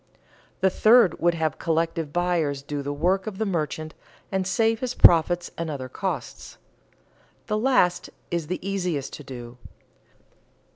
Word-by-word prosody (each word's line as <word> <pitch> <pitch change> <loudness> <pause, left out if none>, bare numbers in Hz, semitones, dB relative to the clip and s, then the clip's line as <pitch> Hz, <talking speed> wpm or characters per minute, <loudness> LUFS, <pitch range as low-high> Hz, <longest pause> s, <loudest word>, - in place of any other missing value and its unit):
The 190 0 +3
third 215 -3 +5
would 175 0 +2
have 160 -3 -2
collective 165 -2 -1
buyers 165 -5 0
do 145 0 -4
the 140 +1 -4
work 180 +7 0
of 205 -3 -5
the 220 - -1
merchant 155 -4 -3 0.4
and 190 -1 -1
save 225 +2 +1
his 250 0 -3
profits 175 +1 +5
and 165 -1 -3
other 135 -4 -5
costs. - - -5 0.9
The 210 - -1
last 220 -8 +2 0.2
is 170 -3 -2
the 180 - -2
easiest 180 -8 -2
to 150 - -8
do. 125 -2 -10
170 Hz, 145 wpm, -25 LUFS, 150-190 Hz, 0.9 s, third